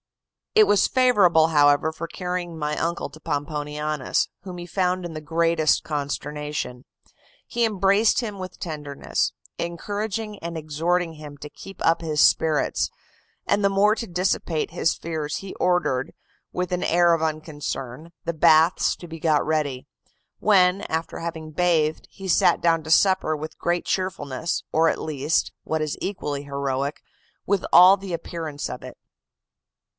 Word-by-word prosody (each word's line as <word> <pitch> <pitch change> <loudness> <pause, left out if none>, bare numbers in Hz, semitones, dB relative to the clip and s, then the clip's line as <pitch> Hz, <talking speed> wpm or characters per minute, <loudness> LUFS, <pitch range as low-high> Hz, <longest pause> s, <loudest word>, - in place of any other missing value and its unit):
It 430 0 +8
was 205 - +4
favorable, 195 -11 +4
however, 145 0 +4
for 165 +1 -6
carrying 180 -1 -4
my 150 -1 -2
uncle 170 -2 -2
to 155 - -13
Pomponianus, 150 0 -2
whom 185 -2 -8
he 175 - -7
found 180 0 -1
in 170 - -6
the 155 - -6
greatest 165 0 +2
consternation. 150 -3 -4 0.6
He 240 - -1
embraced 205 0 +3
him 215 -5 -4
with 185 0 -8
tenderness, 150 -4 -2 0.3
encouraging 205 +5 -4
and 170 0 -5
exhorting 165 +3 -1
him 150 -2 -10
to 150 +1 -9
keep 195 +6 -8
up 165 +1 +3
his 155 -2 -2
spirits; 155 0 +3 0.6
and 205 - +1
the 200 - +4
more 200 +2 +3
to 230 - -5
dissipate 175 -3 -1
his 165 - +1
fears 155 -3 -4
he 195 -1 -7
ordered, 175 -8 0 0.4
with 180 0 -3
an 180 - -1
air 175 0 +4
of 165 - 0
unconcern, 155 -2 -4
the 170 - -1
baths 160 +2 +4
to 175 - -10
be 165 0 -8
got 155 -2 +2
ready; 150 -5 -1 0.5
when, 190 -2 +4
after 160 +1 -3
having 160 -2 -6
bathed, 160 -2 +1
he 195 - -9
sat 175 - +4
down 165 -1 +2
to 160 - -5
supper 185 -4 +3
with 155 +1 -7
great 175 0 0
cheerfulness, 165 -4 -2
or 165 +1 +4
at - - -2
least 150 0 -1
(what 160 0 -2
is 155 -1 -2
equally 145 -8 -3
heroic) 140 0 -3 0.4
with 200 -1 +1
all 180 +3 +9
the 195 -2 -7
appearance 165 -3 -5
of - - -7
it. - - -10
165 Hz, 150 wpm, -24 LUFS, 150-180 Hz, 0.6 s, all